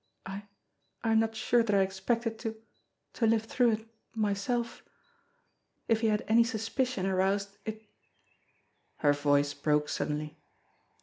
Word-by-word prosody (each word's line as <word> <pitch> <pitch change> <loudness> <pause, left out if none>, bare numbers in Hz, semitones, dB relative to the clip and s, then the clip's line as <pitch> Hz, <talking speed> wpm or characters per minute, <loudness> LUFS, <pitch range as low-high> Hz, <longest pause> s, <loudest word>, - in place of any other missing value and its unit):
I 195 +2 -6 0.6
I 225 - +1
am 220 - +5
not 225 0 0
sure 235 +2 +3
that 215 -3 +1
I 195 - +5
ex 190 0 -5
pected 230 +2 -1
to 225 -1 -4 0.6
to 230 - +1
live 225 0 +3
through 240 +1 +2
it 220 +1 -4 0.3
myself. 225 +3 -1 1.1
If 225 -1 +2
he 225 - +3
had 210 -1 +1
any 230 +2 +6
sus 225 -2 -3
picion 255 -8 0
aroused 195 +1 0
it 220 0 -6 0.6
" - - -42
Her 145 - +6
voice 145 0 +2
broke 150 0 +1
suddenly. 150 0 -3
215 Hz, 150 wpm, -30 LUFS, 190-225 Hz, 1.1 s, any